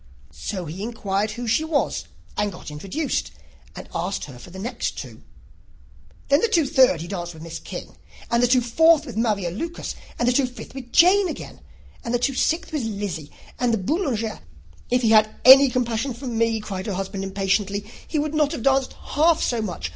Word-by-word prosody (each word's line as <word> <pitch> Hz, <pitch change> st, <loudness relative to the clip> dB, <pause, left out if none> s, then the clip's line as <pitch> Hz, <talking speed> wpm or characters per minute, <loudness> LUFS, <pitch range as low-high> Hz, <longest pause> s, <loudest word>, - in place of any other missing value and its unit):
So 185 Hz, -4 st, -5 dB
he 165 Hz, +5 st, -7 dB
inquired 210 Hz, -2 st, -1 dB
who 235 Hz, +3 st, -5 dB
she 230 Hz, +7 st, +2 dB
was, 300 Hz, -, -1 dB, 0.3 s
and 205 Hz, 0 st, 0 dB
got 180 Hz, -4 st, -9 dB
introduced, 195 Hz, -, -2 dB, 0.5 s
and -, -, -8 dB
asked 180 Hz, +4 st, -2 dB
her 130 Hz, -4 st, -11 dB
for 150 Hz, -, -12 dB
the 185 Hz, -, -11 dB
two 190 Hz, -, -6 dB
next. 240 Hz, +1 st, -3 dB, 1.3 s
Then, 280 Hz, +3 st, +4 dB
the -, -, +3 dB
two 340 Hz, -9 st, +3 dB
third 255 Hz, -11 st, +4 dB
he 170 Hz, -, -6 dB
danced 175 Hz, -3 st, -5 dB
with 160 Hz, -, -10 dB
Miss 165 Hz, 0 st, -6 dB
King, -, -, -8 dB, 0.4 s
and 235 Hz, 0 st, +3 dB
the 245 Hz, -, +4 dB
two 250 Hz, +1 st, +4 dB
fourth 315 Hz, +6 st, +4 dB
with 245 Hz, -7 st, -8 dB
Maria 210 Hz, -6 st, 0 dB
Lucas, 330 Hz, -, -5 dB, 0.2 s
and 240 Hz, -, 0 dB
the -, -, +5 dB
two 260 Hz, 0 st, +3 dB
fifth 245 Hz, 0 st, -10 dB
with 255 Hz, -3 st, -9 dB
Jane 375 Hz, +3 st, +6 dB
again, -, -, -7 dB, 0.4 s
and 235 Hz, +1 st, -1 dB
the -, -, +4 dB
two 260 Hz, +3 st, 0 dB
sixth 325 Hz, +6 st, 0 dB
with 300 Hz, -, 0 dB
Lizzy, 200 Hz, -9 st, -4 dB, 0.3 s
and 245 Hz, -1 st, +2 dB
the 225 Hz, -, +2 dB
Boulanger 230 Hz, -, -1 dB, 0.3 s
" 80 Hz, +1 st, -26 dB
"If 250 Hz, 0 st, +2 dB
he 225 Hz, -, +4 dB
had 215 Hz, -1 st, +6 dB
had -, -, -20 dB
any 270 Hz, +1 st, +10 dB
compassion 245 Hz, 0 st, -1 dB
for 260 Hz, +4 st, -9 dB
me," 230 Hz, -2 st, +1 dB
cried 190 Hz, -2 st, -5 dB
her 205 Hz, -, -2 dB
husband 195 Hz, +1 st, -4 dB
impatiently, 200 Hz, +1 st, -1 dB, 0.2 s
"he 315 Hz, -, -2 dB
would 300 Hz, +1 st, -1 dB
not 300 Hz, -2 st, +2 dB
have 230 Hz, -, -5 dB
danced 270 Hz, -1 st, +2 dB
half 320 Hz, +2 st, +1 dB
so 235 Hz, -2 st, 0 dB
much! 175 Hz, -, -4 dB
230 Hz, 205 wpm, -23 LUFS, 195-270 Hz, 1.3 s, any